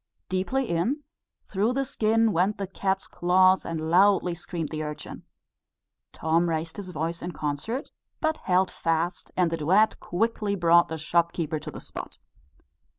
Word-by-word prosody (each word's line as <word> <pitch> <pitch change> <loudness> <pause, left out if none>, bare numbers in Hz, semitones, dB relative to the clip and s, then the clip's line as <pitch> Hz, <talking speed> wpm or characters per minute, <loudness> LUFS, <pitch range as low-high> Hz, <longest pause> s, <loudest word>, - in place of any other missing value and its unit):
Deeply 195 +8 0
in, 225 - 0 0.4
through 210 +5 0
the 275 +1 0
skin, 225 -1 +2
went 190 +4 +1
the 195 - -2
cat's 190 0 -2
claws, 185 +1 +3
and 160 -1 -3
loudly 190 -1 +4
screamed 170 -2 -5
the 155 -1 -4
urchin. 150 -1 -7 0.9
Tom 165 +2 +1
raised 165 +2 -3
his 200 -2 -6
voice 165 +1 -3
in 175 0 -5
concert, 150 - -3 0.3
but 315 0 0
held 185 +1 +1
fast, 165 +2 -1
and 180 -2 +3
the 165 - -1
duet 190 +8 +3
quickly 210 +1 -1
brought 170 -2 +5
the 160 - -4
shopkeeper 165 0 0
to - - -8
the - - -8
spot. - - -8
180 Hz, 155 wpm, -26 LUFS, 165-200 Hz, 0.9 s, brought